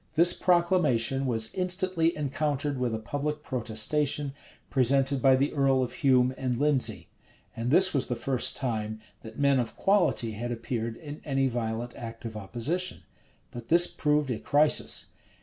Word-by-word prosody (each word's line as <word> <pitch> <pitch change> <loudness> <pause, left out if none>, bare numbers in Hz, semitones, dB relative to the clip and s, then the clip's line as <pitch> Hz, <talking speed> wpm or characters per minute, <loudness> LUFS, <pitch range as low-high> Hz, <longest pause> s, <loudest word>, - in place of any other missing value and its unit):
This 170 +2 +6
proclamation 155 -9 +2
was 115 -2 -1
instantly 180 -3 0
encountered 145 -1 -2
with 120 -3 -1
a - - -2
public 145 +6 -4
protestation, 135 +4 -1 0.4
presented 135 +1 +2
by 135 0 +5
the 140 +3 0
earl 135 -3 +2
of 125 - -5
Hume 130 -4 +3
and 125 -2 -1
Lindesey: 145 -1 0 0.5
and 115 +2 -3
this 190 +7 +5
was 135 -3 +2
the 125 - -2
first 130 +1 -1
time 110 -4 -3 0.2
that 110 0 -11
men 140 -2 +3
of 120 -2 -3
quality 190 - +1
had 120 +3 -5
appeared 115 -1 -4
in 150 -1 -9
any 135 -2 0
violent 120 -1 -3
act 115 0 -8
of 110 -1 -6
opposition.[*] 125 - -3 0.5
But 120 -1 -9
this 170 +1 +5
proved 150 -5 0
a 115 - -3
crisis. 150 +1 +1
135 Hz, 155 wpm, -27 LUFS, 120-150 Hz, 0.5 s, This